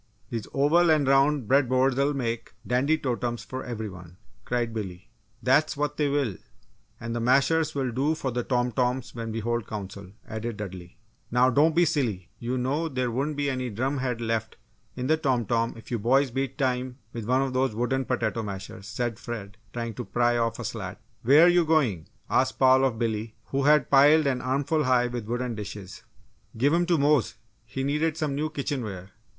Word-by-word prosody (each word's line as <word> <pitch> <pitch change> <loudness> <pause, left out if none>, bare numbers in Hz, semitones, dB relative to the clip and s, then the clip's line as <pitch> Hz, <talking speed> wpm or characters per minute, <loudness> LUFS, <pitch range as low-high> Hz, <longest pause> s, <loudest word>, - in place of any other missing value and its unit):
These 115 -4 -4
oval 160 +5 +3
and 155 -3 +4
round 135 -2 +3
bread 135 0 +3
boards'll 135 +2 +2
make 115 -4 -3
dandy 135 +6 +2
totems 120 -4 -2
for 130 0 -6
every 110 -3 -4
one!" 90 -2 -11 0.3
cried 120 -2 -1
Billy. 100 -1 -6 0.3
"That's 140 +4 +3
what 150 0 -1
they 150 -2 +1
will; 140 - 0 0.6
and 115 0 -4
the - - -1
mashers 145 +6 +2
will 130 -3 -1
do 140 +6 +1
for 135 -4 -3
the 120 +1 -1
tom 125 0 0
toms 125 +1 -1
when 115 -1 -5
we 115 +1 -3
hold 120 0 -2
Council," 100 -2 -7 0.2
added 110 0 -4
Dudley. 95 -3 -8 0.3
"Now 125 +2 +4
don't 150 +4 +3
be 175 0 +5
silly 115 - -1
you 125 +2 -2
know 140 +6 -1
there 130 -3 -1
wouldn't 140 +5 -2
be 145 0 0
any 130 -2 -2
drum 130 +6 -1
head 125 -2 -2
left 115 -1 -2 0.4
in 125 - -3
the 155 +4 +3
tom 130 -7 0
tom 115 +2 0
if 115 +1 -13
you 120 - 0
boys 130 +4 +3
beat 135 +1 -3
time 130 -2 -1 0.2
with 115 -2 -5
one 130 +2 +3
of 135 -1 -3
those 130 -3 +1
wooden 130 +3 0
potato 115 -3 -1
mashers," 100 -1 -7
said 115 +1 -3
Fred, 105 -5 -6 0.2
trying 115 0 -4
to - - -5
pry 120 +4 +1
off 115 -1 0
a 120 - -6
slat. 105 -4 -5 0.2
"Where're 145 +8 +7
you 175 0 +5
going?" 140 - +1 0.2
asked - - +1
Paul 130 0 +5
of 125 -4 0
Billy, 110 -1 -2
who 135 0 0
had 150 -3 +4
piled 145 +3 +6
an 130 -2 0
armful 140 +4 0
high 125 -1 +3
with 120 -3 -4
wooden 120 +1 -2
dishes. 100 -2 -8 0.6
"Give 140 +6 +3
'em 175 +1 +2
to 175 -2 +3
Mose 145 -3 +2 0.3
he 135 +2 -4
needed 150 +3 0
some 150 -3 -1
new 150 +3 -1
kitchenware!" 115 - -4
125 Hz, 195 wpm, -26 LUFS, 115-140 Hz, 0.6 s, Where're